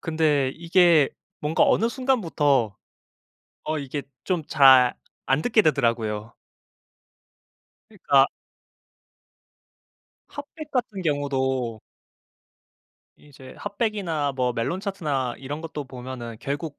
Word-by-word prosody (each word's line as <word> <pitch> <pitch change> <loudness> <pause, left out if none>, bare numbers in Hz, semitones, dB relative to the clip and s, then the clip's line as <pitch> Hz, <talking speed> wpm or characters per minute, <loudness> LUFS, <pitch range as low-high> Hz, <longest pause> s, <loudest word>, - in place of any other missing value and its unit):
근데 155 -4 +1
이게 170 -3 +4 0.3
뭔가 150 +2 +2
어느 225 - +3
순간부터 165 - +1 0.9
어 155 0 -2
이게 140 +1 -4 0.2
좀 180 -4 -1
잘 130 -4 +6 0.3
안 135 +3 +2
듣게 220 +3 +3
되더라고요. 115 - 0 1.6
그러니까 140 -10 +3 2.0
핫 285 - -8
100 310 -2 -8
같은 240 -6 -2
경우도 130 -6 -1 1.4
이제 135 -3 -15
핫 200 - -7
100 225 -3 +1
이나 160 -8 -2
뭐 125 -2 0
멜론차트나 145 - -2
이런 145 +3 -6
것도 155 -3 -6
보면은 125 -2 -8
결국 145 +1 -4
145 Hz, 195 characters per minute, -24 LUFS, 130-175 Hz, 2.0 s, 잘